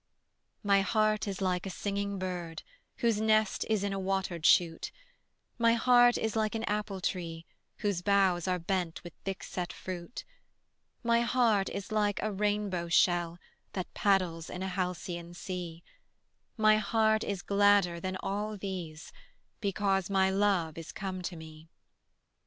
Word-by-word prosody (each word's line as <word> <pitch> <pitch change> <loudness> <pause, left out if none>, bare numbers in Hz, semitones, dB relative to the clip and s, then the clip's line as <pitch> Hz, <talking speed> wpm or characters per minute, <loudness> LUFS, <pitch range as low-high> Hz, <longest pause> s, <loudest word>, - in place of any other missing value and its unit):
My 200 -1 +4
heart 215 +2 +1
is 195 -1 -4
like 180 0 0
a - - -3
singing 200 +1 -3
bird 180 -3 -5 0.4
Whose 220 -2 +2
nest 215 -1 +2
is 215 -3 +1
in 200 -1 -1
a 195 - -2
watered 190 -4 0
shoot; 165 -2 +3 0.7
My 230 0 +5
heart 245 +1 +5
is 220 -1 -2
like 215 0 0
an 225 - -2
apple 210 -3 -2
tree 165 -3 -3 0.4
Whose 200 -4 0
boughs 190 -3 +2
are 180 0 +1
bent 175 -1 -2
with 175 -2 -9
thick 195 -1 -4
set 180 -1 -4
fruit; 185 +4 -7 0.8
My 235 0 +3
heart 235 -5 +2
is 200 +2 -6
like 210 -2 +1
a 215 - 0
rainbow 205 -3 -1
shell 175 0 +3 0.4
That 185 -2 -5
paddles 180 -5 +1
in 180 - -5
a 190 - -2
halcyon 180 -2 -4
sea; 175 -2 -6 0.7
My 215 -1 +5
heart 220 0 +2
is 195 -3 -3
gladder 200 -4 +3
than 185 +2 -3
all 210 +2 -3
these 180 -5 -6 0.5
Because 195 -2 0
my 190 -1 +3
love 190 -5 +1
is 165 -1 -8
come 190 -1 -5
to 175 0 -5
me. 160 0 -12
195 Hz, 150 wpm, -30 LUFS, 175-210 Hz, 0.8 s, My